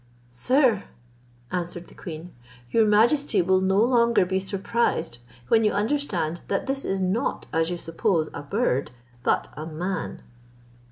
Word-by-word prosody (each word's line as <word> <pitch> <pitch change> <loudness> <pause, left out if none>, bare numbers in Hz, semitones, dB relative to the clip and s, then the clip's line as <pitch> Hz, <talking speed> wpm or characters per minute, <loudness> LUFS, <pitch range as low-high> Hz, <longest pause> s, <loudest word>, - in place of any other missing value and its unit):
"Sir," 240 - +2 0.7
answered 175 -1 -3
the - - -16
queen, 165 +1 -8 0.4
"your 225 -1 +4
majesty 230 +3 +3
will 185 +1 +3
no 190 +1 +2
longer 235 -3 +4
be 190 +1 0
surprised, 195 - -1 0.3
when 225 - +4
you 210 - +2
understand, 205 - -1
that 195 - -1
this 270 0 -2
is 195 - -1
not 190 +4 -1
as 165 0 +2
you 175 - -2
suppose 165 -1 0
a - - -5
bird, 145 - 0 0.3
but - - +1
a 155 +2 -6
man." 175 +3 -4
190 Hz, 145 wpm, -25 LUFS, 170-230 Hz, 0.7 s, your